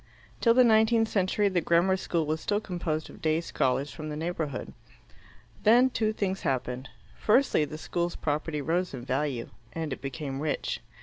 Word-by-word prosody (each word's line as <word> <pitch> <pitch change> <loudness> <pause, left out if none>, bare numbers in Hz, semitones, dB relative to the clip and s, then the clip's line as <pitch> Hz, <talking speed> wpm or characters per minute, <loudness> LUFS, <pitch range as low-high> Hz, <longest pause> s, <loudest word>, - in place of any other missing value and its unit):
Till 230 -1 +4
the 255 - +7
nineteenth 225 0 +4
century 200 +1 +2
the 185 -3 +1
grammar 170 +3 +3
school 170 -3 -1
was 155 +1 -2
still 205 0 0
composed 175 -6 -3
of - - -14
day 155 0 +2
scholars 140 -3 0
from 155 -1 -7
the 150 - -4
neighbourhood. 160 -4 -3 0.9
Then 245 +4 +5
two 215 -2 +1
things 195 -3 -2
happened. 130 0 -2 0.3
Firstly, 220 - +3
the 150 +2 -7
school's 175 +2 -2
property 150 0 -2
rose 175 +1 0
in 120 -1 -8
value, 135 -3 -2 0.2
and 160 -4 -3
it - - -8
became 135 0 -4
rich. 150 0 -2
165 Hz, 170 wpm, -28 LUFS, 150-200 Hz, 0.9 s, the